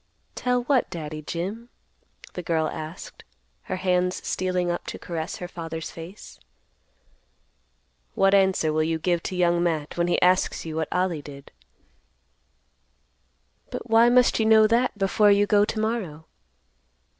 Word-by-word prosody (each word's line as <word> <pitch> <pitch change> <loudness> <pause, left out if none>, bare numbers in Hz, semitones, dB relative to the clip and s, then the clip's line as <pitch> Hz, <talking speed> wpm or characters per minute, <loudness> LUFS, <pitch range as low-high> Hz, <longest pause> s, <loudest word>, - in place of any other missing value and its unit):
"Tell 250 -1 0
what, 260 -1 +1
Daddy 155 -3 -6
Jim?" 195 +10 -5 0.6
the 180 - -5
girl 160 -2 0
asked, 155 +3 -8 0.4
her 185 - -3
hands 180 0 0
stealing 180 -1 -1
up 175 - -5
to - - -5
caress 165 -2 -5
her 180 - -6
father's 165 -2 -6
face. 170 +5 -11 1.8
"What 195 0 +3
answer 190 -5 +3
will 155 - +1
you 160 +1 0
give 170 +1 0
to 185 - -5
Young 175 -1 +2
Matt 160 -3 -2
when 170 - +2
he 175 - +1
asks 180 -1 +2
you 160 -1 -5
what 160 -1 -2
Ollie 180 -4 0
did?" 140 -1 -12 2.2
"But 230 - -7
why 230 +1 +6
must 250 -1 +4
you 220 - +2
know 220 -1 +6
that 230 +1 +1
before 205 +1 +3
you 200 0 +4
go 205 0 +4
to 215 - -4
morrow?" 210 -9 -3
180 Hz, 145 wpm, -25 LUFS, 165-205 Hz, 2.2 s, why